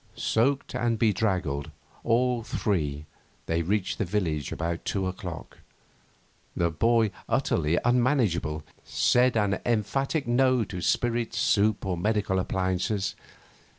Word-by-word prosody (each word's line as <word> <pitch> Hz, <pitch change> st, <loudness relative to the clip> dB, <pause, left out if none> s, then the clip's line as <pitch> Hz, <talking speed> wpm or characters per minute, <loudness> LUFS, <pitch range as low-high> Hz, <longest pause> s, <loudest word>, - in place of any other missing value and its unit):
Soaked 130 Hz, +4 st, 0 dB
and 120 Hz, -1 st, 0 dB
bedraggled, 95 Hz, -10 st, 0 dB, 0.3 s
all 125 Hz, +1 st, +2 dB
three, 75 Hz, -10 st, -2 dB, 0.4 s
they 80 Hz, +3 st, 0 dB
reached 95 Hz, +3 st, -1 dB
the -, -, +2 dB
village 85 Hz, -8 st, -2 dB
about 85 Hz, +1 st, -3 dB
two 95 Hz, -2 st, -1 dB
o'clock. 90 Hz, -3 st, -6 dB, 1.0 s
The 85 Hz, -1 st, +1 dB
boy, 115 Hz, +5 st, +2 dB, 0.2 s
utterly 80 Hz, +1 st, +1 dB
unmanageable, 120 Hz, -, +1 dB, 0.2 s
said 125 Hz, -1 st, +2 dB
an 100 Hz, -2 st, +1 dB
emphatic 135 Hz, -, 0 dB
No 130 Hz, 0 st, +3 dB
to 95 Hz, -3 st, -6 dB
spirits, 120 Hz, +4 st, 0 dB
soup, 105 Hz, 0 st, +2 dB
or 90 Hz, -2 st, -1 dB
medical 105 Hz, 0 st, 0 dB
appliances. 95 Hz, +2 st, -1 dB
105 Hz, 115 wpm, -27 LUFS, 90-120 Hz, 1.0 s, No